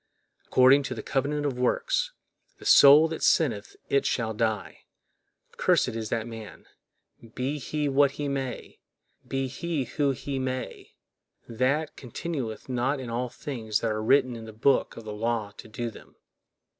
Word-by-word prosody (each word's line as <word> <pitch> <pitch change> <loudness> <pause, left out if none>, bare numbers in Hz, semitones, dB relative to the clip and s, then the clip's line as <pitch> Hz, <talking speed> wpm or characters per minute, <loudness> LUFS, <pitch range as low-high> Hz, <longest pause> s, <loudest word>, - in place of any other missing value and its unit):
According 130 +2 +6
to 130 - -4
the 110 - -6
covenant 145 +2 -1
of 130 -3 -2
works, - - +1 0.5
"the - - -14
soul 145 +3 +8
that 160 - -5
sinneth 115 -10 +1
it 140 - +2
shall 115 -2 -1
die"; 110 -2 -2 0.8
cursed - - +3
is 110 -1 -4
that 115 -1 -1
man, 115 -2 -10 0.7
be 135 +4 -2
he 150 +2 -2
what 140 0 +3
he 145 0 -4
may, 135 -3 -4 0.5
be 135 0 -1
he 160 +2 -3
who 140 +4 -1
he 135 +1 -3
may, 130 0 -5 0.5
that 135 +7 0
continueth 125 -2 -5
not 130 +2 0
in 125 -3 -6
all 125 +2 -2
things 115 -5 -3
that 115 - 0
are 110 0 -2
written 130 +2 +3
in 115 -1 -8
the 110 - -10
book 130 +6 +1
of 115 - -8
the 105 - -5
law 110 -1 -2
to - - -10
do 115 +1 -4
them. - - -16
130 Hz, 160 wpm, -27 LUFS, 115-140 Hz, 0.8 s, soul